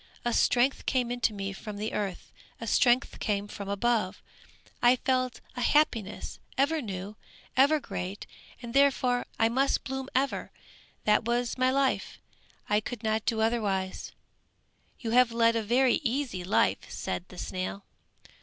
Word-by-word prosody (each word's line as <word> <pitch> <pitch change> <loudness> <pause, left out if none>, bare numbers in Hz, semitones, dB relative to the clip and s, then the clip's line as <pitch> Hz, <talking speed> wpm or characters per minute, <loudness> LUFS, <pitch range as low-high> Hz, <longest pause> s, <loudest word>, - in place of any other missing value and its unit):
A 240 - +1
strength 250 +4 +2
came 245 -1 0
to 235 - +2
me 195 -1 -4
from 210 +1 -7
the 215 +2 -3
earth, 195 -3 -4 0.3
a 230 - -5
strength 245 +3 +3
came 205 -1 -1
from 200 -1 -7
above, 210 -1 0 0.6
I 245 +1 +6
felt 255 -1 -1
a 250 - -3
happiness, 240 -9 +1 0.2
ever 300 +4 +2
new, 200 -2 -6 0.4
ever 285 +4 +5
great 190 -6 -5 0.4
and 235 -1 -6
therefore 265 -3 +3
I 225 - +4
must 265 +4 +1
blossom 265 0 -4
ever, 270 +2 0 0.5
that 210 0 +3
was 240 0 0
my 255 0 +2
life, 270 0 0 0.5
I 210 0 +3
could 235 +1 -7
not 220 0 0
do 225 -2 +1
otherwise!" 205 -5 -1 0.9
"You 230 -3 -3
have 250 0 +5
led 230 0 +3
a 225 - +1
very 245 +4 +3
easy 245 -7 -1
life!" 185 - +1
said 175 - -4
the 180 - -12
snail. 185 +2 -4
235 Hz, 150 wpm, -29 LUFS, 205-255 Hz, 0.9 s, I